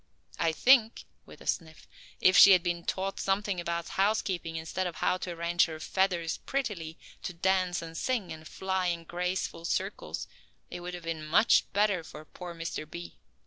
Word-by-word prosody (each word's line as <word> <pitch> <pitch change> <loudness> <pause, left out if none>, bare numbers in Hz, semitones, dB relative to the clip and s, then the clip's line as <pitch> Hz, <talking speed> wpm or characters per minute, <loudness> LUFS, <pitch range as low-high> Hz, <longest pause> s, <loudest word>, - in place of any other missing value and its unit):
I 165 - +2
think," 230 - +4 0.2
with - - -14
a - - -12
sniff, 160 -2 -3 0.3
"if 185 - +5
she 200 - +10
had 180 -2 +4
been 170 -1 -2
taught 195 +1 -2
something 195 -1 0
about 170 -1 -3
housekeeping 190 -5 0
instead 165 +3 -2
of 170 - -6
how 180 - +1
to 185 - -5
arrange 170 +1 +2
her 160 -1 -7
feathers 175 -1 0
prettily, 205 -12 -3 0.2
to 180 - -5
dance 185 0 +1
and 165 0 -9
sing, 230 -1 -1
and 155 0 -11
fly 190 -1 -1
in 170 -1 -1
graceful 180 0 -3
circles 190 +4 -3 0.4
it - - -5
would 180 0 -6
have 175 - -9
been 165 -2 -4
much 160 +9 +4
better 200 -4 +2
for 155 0 -11
poor 175 +1 -9
Mr. 165 -2 -5
B. 85 - -9
175 Hz, 180 wpm, -29 LUFS, 165-190 Hz, 0.4 s, she